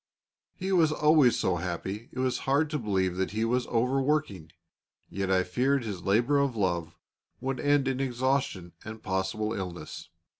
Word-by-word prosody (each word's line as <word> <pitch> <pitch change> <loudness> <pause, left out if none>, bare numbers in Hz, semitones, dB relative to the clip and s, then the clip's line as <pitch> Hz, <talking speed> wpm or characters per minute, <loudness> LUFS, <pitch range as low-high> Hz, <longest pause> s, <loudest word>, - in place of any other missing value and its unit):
He 190 +1 -3
was 165 -5 +4
always 150 -6 +4
so 95 -6 +1
happy 95 +6 -4
it - - -13
was 130 -1 0
hard 145 +3 +2
to 150 - -1
believe 95 -5 0
that 95 +2 -1
he 110 +1 0
was 125 +2 0
overworking; 125 - 0 0.6
yet 95 0 -2
I 95 -1 +3
feared 130 +9 +1
his 100 -5 -5
labour 120 +10 +2
of 140 -4 0
love 85 -5 -1 0.4
would 130 +1 -3
end 145 -2 +2
in 135 -1 -1
exhaustion 130 -8 -1
and 110 0 -9
possible 95 +3 -1
illness. 90 -6 -6
115 Hz, 160 wpm, -28 LUFS, 95-135 Hz, 0.6 s, was